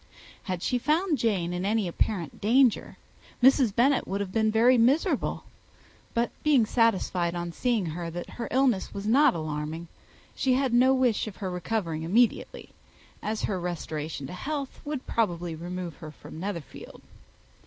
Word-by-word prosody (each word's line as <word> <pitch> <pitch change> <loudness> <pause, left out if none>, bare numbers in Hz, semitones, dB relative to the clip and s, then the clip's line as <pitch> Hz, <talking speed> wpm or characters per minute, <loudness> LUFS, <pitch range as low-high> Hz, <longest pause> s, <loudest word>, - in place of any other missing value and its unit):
Had 185 -3 -3
she 250 - +1
found 310 +4 +1
Jane 185 -7 0
in 180 +1 -3
any 210 0 +1
apparent 175 -1 -2
danger, 240 +2 +3 0.5
Mrs. 260 -5 +5
Bennet 265 +3 +3
would 195 +1 -2
have 200 -2 -3
been 220 +1 +2
very 230 +4 +5
miserable; 250 +7 +2 0.7
but 235 +1 +1
being 280 -7 +4
satisfied 190 -7 +1
on 175 0 -3
seeing 230 +1 0
her 165 +1 -4
that 175 +1 -7
her 235 - -5
illness 255 -8 +1
was 200 0 -5
not 250 +1 +4
alarming, 155 +1 -4 0.5
she 260 -2 +2
had 265 -2 0
no 255 +2 +5
wish 250 -5 +1
of 205 - -7
her 190 -3 -4
recovering 180 -3 -2
immediately, 215 +9 +1 0.5
as 215 0 -3
her 190 -3 -1
restoration 160 -4 -4
to 135 - -7
health 280 +7 -5
would 290 -3 -4
probably 175 -6 -1
remove 175 +1 -6
her 155 -3 -9
from 155 +1 -11
Netherfield. 175 -6 -7
205 Hz, 155 wpm, -27 LUFS, 175-245 Hz, 0.7 s, Mrs